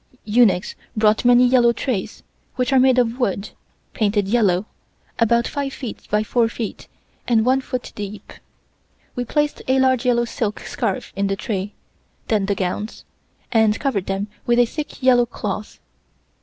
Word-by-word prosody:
Eunuchs 210 -4 +3 0.2
brought 215 0 +3
many 245 +1 +6
yellow 245 -1 +5
trays, 235 -4 -3 0.3
which 250 +1 0
are 265 - +6
made 260 0 +4
of 240 0 +1
wood, 200 -4 -1 0.4
painted 205 -2 +1
yellow, 200 -4 +2 0.5
about 235 0 +3
five 280 -2 -3
feet 245 -5 -8
by 210 +1 +2
four 230 +1 +1
feet 230 -2 -6 0.4
and 230 -2 +3
one 260 +1 +3
foot 255 -1 -5
deep. 205 0 -8 0.8
We 245 - -2
placed 295 +4 -1
a 260 +1 +3
large 260 -2 +3
yellow 240 -2 +2
silk 220 -3 -3
scarf 220 -7 -3
in 200 +1 0
the 195 - 0
tray, 195 +1 -4 0.5
then 210 -3 +1
the 200 - +1
gowns, 195 +3 -4 0.5
and 220 -2 +3
covered 210 -10 -1
them 195 +1 -1 0.2
with 240 0 +3
a 245 - +6
thick 295 +2 -7
yellow 245 -2 +5
cloth. 210 -2 -5
230 Hz, 155 wpm, -21 LUFS, 205-250 Hz, 0.8 s, many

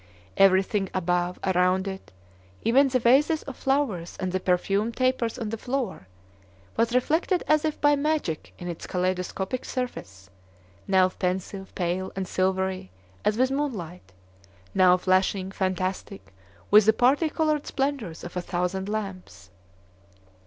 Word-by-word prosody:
Everything 195 +1 +3
above, 180 0 0
around 185 0 +2
it, 190 0 -7 0.5
even 270 +5 +5
the 255 -1 +1
vases 275 +7 +3
of 275 - -8
flowers 265 -12 -1
and 185 -1 -2
the 185 - 0
perfumed 195 +5 0
tapers 255 -3 0
on 225 -4 -4
the 225 0 -4
floor, 245 - -3 0.7
was 230 +1 +1
reflected 320 +8 +1
as 305 0 +3
if 310 - -2
by 290 0 +4
magic 290 - -2
in 175 - -7
its 170 -2 -6
kaleidoscopic 185 +5 -2
surface, 95 - -6 0.6
now 190 -1 +4
pensive, 190 +1 -4
pale, 180 +1 -2
and 190 -1 -3
silvery 190 - -1 0.3
as 210 - +1
with 255 +2 +2
moonlight, 180 - -4 0.6
now 185 -1 +5
flashing, 185 +1 +1
fantastic, 185 - -3 0.4
with 210 0 +7
the 220 - +7
party 275 +7 +3
colored 305 -2 0
splendors 270 - -2
of 175 - -8
a 180 - -1
thousand 180 +2 -2
lamps. 195 - -6
195 Hz, 135 wpm, -26 LUFS, 185-255 Hz, 0.7 s, with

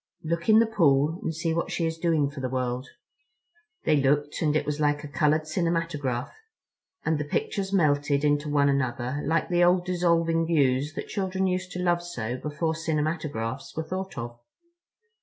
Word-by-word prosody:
Look 170 +4 -2
in 215 - +8
the 230 - +6
pool 160 -6 +2
and - - -2
see 160 +1 -1
what 170 - -1
she 170 - -1
is 160 0 -3
doing 160 -5 +1
for 140 - -8
the 130 -1 -2
world." 125 0 -2 1.0
They 155 -2 +4
looked, 145 +2 +1
and 150 -2 +2
it 155 - +1
was 150 0 -2
like 150 0 +1
a - - -5
colored 150 +3 +2
cinematograph; 155 -6 -1 0.7
and 155 -1 +1
the - - -1
pictures 195 +6 -2
melted 145 -5 +2
into 145 0 +1
one 145 -1 +3
another 130 0 -1
like 165 0 0
the 175 -1 +3
old 180 0 +4
dissolving 170 -2 +1
views 145 -2 +2
that - - -5
children 190 -1 -1
used 185 0 -1
to 180 - -3
love 175 -1 +2
so 125 -9 -4
before 150 +4 -2
cinematographs 150 -6 -3
were 160 - -1
thought 190 +2 -5
of. 120 0 -6
155 Hz, 175 wpm, -26 LUFS, 140-170 Hz, 1.0 s, in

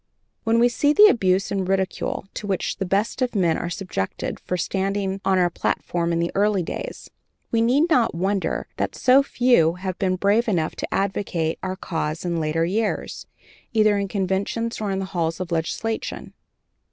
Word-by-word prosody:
When 225 +1 +3
we 235 +1 +5
see 290 +4 +2
the 415 +6 +8
abuse 190 - +2
and 195 -2 -1
ridicule 190 0 -1
to 205 - -6
which 190 -2 -1
the 195 - -3
best 205 +7 0
of 250 -2 0
men 175 -5 +2
were 175 - -3
subjected 175 - -4
for 180 - -3
standing 195 +1 -1
on 190 -1 +2
our 175 -1 +3
platform 170 0 -1
in 170 - +1
the 170 0 0
early 200 -2 +2
days, - - -6 0.4
we 230 - +2
need 265 +8 +3
not 250 - +2
wonder 190 +3 -1
that - - -2
so 260 +2 +5
few 245 - +3
have 185 0 -5
been 185 -1 +1
brave 205 +5 +2
enough 170 -7 0
to - - -5
advocate 190 -4 -1
our 185 0 -3
cause 160 -3 -3
in 170 -1 -1
later 160 +1 0
years, 210 +5 -2 0.5
either 215 -2 +4
in 200 - -1
conventions 200 +4 -2
or 210 - -1
in 195 - -1
the 190 - -2
halls 165 -1 -1
of 185 -1 -5
legislation. 170 +7 -3
195 Hz, 180 wpm, -23 LUFS, 175-220 Hz, 0.5 s, the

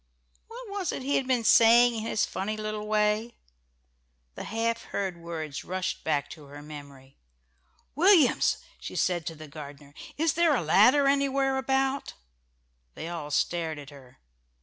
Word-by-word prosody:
What 480 +1 -10
was 400 -4 -3
it - - -5
he 280 +2 +1
had 265 - -2
been 250 -3 +1
saying 235 +2 +6
in 225 - -4
his 215 -2 0
funny 200 +3 -4
little 215 0 -4
way? 215 +2 0 1.0
The - - -8
half 230 +1 -2
heard 190 -3 -3
words 160 -3 -6
rushed 185 +1 -4
back 145 -3 0
to 150 - -11
her 145 +1 -11
memory. 140 -3 -12 0.8
"Williams," 335 -2 +4 0.2
she - - -8
said 175 -4 0
to 165 - -4
the 155 0 -11
gardener, 145 -1 -11 0.2
"is 325 +1 +1
there 330 -2 +3
a 210 - -1
ladder 240 - +5
anywhere 275 -1 +1
about?" 265 +1 -1 0.8
They 165 - -6
all 165 -4 -6
stared 160 +1 -1
at 145 0 -10
her. 130 -3 -16
210 Hz, 155 wpm, -27 LUFS, -, 1.0 s, saying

